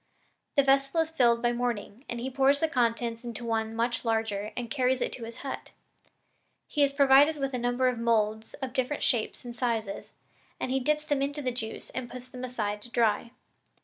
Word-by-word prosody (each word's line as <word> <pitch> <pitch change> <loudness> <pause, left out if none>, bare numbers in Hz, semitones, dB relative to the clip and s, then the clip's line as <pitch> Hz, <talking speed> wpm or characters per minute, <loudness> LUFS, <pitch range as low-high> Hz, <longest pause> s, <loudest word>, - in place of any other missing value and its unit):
The 280 - +5
vessel 275 +4 +3
is 320 0 -2
filled 235 -6 +3
by 240 - +3
morning, 240 0 -3
and 240 - -3
he 260 +3 -3
pours 275 +2 +4
the 320 - +2
contents 235 -4 0
into 240 0 -6
one 225 -1 -1
much 235 0 0
larger 220 -2 -1
and 235 -2 -4
carries 260 -2 +2
it - - -1
to 235 - -5
his 230 +1 -9
hut. 270 - -6 0.9
He 295 - -1
is 280 -1 +5
provided 280 +2 +6
with 275 -1 -2
a 250 - -1
number 245 +2 +1
of 250 -2 0
moulds 220 -1 +1
of 265 -3 -5
different 265 +2 -1
shapes 235 0 0
and 240 -1 -7
sizes, 225 -5 -2 0.4
and 255 - -2
he 265 - +2
dips 300 +3 0
them 290 -2 0
into 285 +1 -2
the 255 - 0
juice 225 -2 -5
and 255 -2 -5
puts 255 0 -9
them 255 -1 -7
aside 210 -5 -2
to 240 - -10
dry. 230 -1 +1
245 Hz, 205 wpm, -28 LUFS, 230-270 Hz, 0.9 s, provided